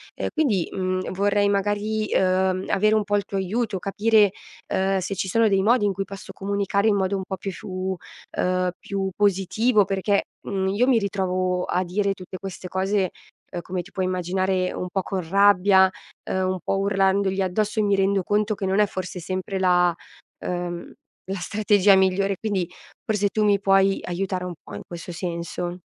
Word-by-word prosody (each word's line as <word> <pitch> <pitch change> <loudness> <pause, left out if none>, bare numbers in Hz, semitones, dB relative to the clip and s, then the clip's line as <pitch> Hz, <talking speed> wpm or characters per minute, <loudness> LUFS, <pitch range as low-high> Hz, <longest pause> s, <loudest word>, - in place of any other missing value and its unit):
E - - -2
quindi, 240 - +1
mhmm, 185 0 -2
vorrei 205 +1 +2
magari, 205 +2 0
uhm, 185 0 +2
avere 215 +2 +3
un 215 - +2
po' 205 0 0
il 205 - +1
tuo 195 - -4
aiuto, 200 +1 -1
capire, 210 +1 +3 0.4
uhm, 195 +1 +1
se 190 +2 -3
ci 190 - -2
sono 225 +4 +3
dei 195 -2 +3
modi 230 -1 +4
in 200 - +1
cui 195 +1 -2
posso 195 0 -10
comunicare 200 +1 0
in 210 - +4
modo 190 0 0
un 190 - -2
po' 190 - -4
più 195 - -4
fu 185 0 -4 0.4
uhm, 185 0 +1
più 195 -1 -3
positivo 205 +2 +2
perché, 195 +1 +1 0.2
mhmm, 190 -1 -2
io 210 +6 +2
mi 245 -4 +4
ritrovo 185 -2 -1
a 180 - 0
dire 195 +2 0
tutte 185 0 -9
queste 190 -1 -7
cose, 190 0 0 0.4
ehm, 175 - -4
come 180 +1 -4
ti - - -15
puoi 185 - -1
immaginare 185 +1 0
un 180 - -4
po' 190 - 0
con 185 -3 -4
rabbia, 195 0 +5 0.4
uhm, 185 0 0
un 185 - -3
po' 195 - 0
urlandogli 195 0 +1
addosso, 210 +4 0
e - - +3
mi 200 -1 +3
rendo 195 -1 +2
conto 210 +2 +1
che 195 - -4
non 190 +2 +1
è 210 - +6
forse 185 -1 -5
sempre 185 +2 -3
la 180 -1 +4 0.5
uhm, 175 -1 -4 0.4
la 195 - -2
strategia 205 +1 +4
migliore, 190 0 +2
quindi 195 -5 -1 0.4
forse 210 -2 +1
tu 215 +2 0
mi 205 -1 +3
puoi 195 0 +3
aiutare 185 0 -2
un 180 - -4
po' - - -9
in - - -6
questo 175 0 -7
senso. 175 +1 -4
195 Hz, 185 wpm, -24 LUFS, 185-205 Hz, 0.5 s, è